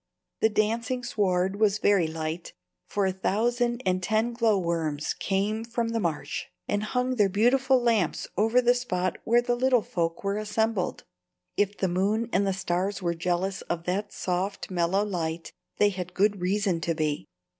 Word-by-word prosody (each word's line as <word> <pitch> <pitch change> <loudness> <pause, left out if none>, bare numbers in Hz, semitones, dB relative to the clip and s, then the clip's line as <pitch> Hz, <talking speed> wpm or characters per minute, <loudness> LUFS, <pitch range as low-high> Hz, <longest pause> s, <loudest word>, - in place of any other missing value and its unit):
The 220 - +4
dancing 230 +4 0
sward 195 -4 0
was 210 -2 +3
very 200 -5 +3
light, 160 +1 -4 0.3
for 200 -1 0
a 190 - +2
thousand 240 +6 0
and 185 0 +1
ten 220 +5 +1
glowworms 170 -10 0
came 205 +3 -1
from 230 0 -2
the 230 0 -1
marsh 155 -6 -2 0.2
and 205 - 0
hung 250 +4 -1
their 205 -3 +4
beautiful 255 +6 +3
lamps 225 -8 +1
over 225 +5 +3
the 245 +1 +5
spot 185 -8 -2
where 240 +2 +4
the 245 0 +1
little 250 -2 +3
folk 165 0 -2
were 200 +1 0
assembled. 215 -2 -1 0.5
If 205 0 0
the 190 - +1
moon 205 +6 0
and 195 +2 +2
the - - +2
stars 185 +1 -2
were 170 -1 +1
jealous 180 +3 -1
of 170 -1 -2
that 190 +4 -2
soft, 185 +2 -3
mellow 185 +3 +1
light, 165 -4 -3 0.2
they 205 - +5
had 180 -2 -6
good 200 -1 +2
reason 190 -2 0
to 165 +1 -1
be. 150 - -1
200 Hz, 165 wpm, -27 LUFS, 180-225 Hz, 0.5 s, the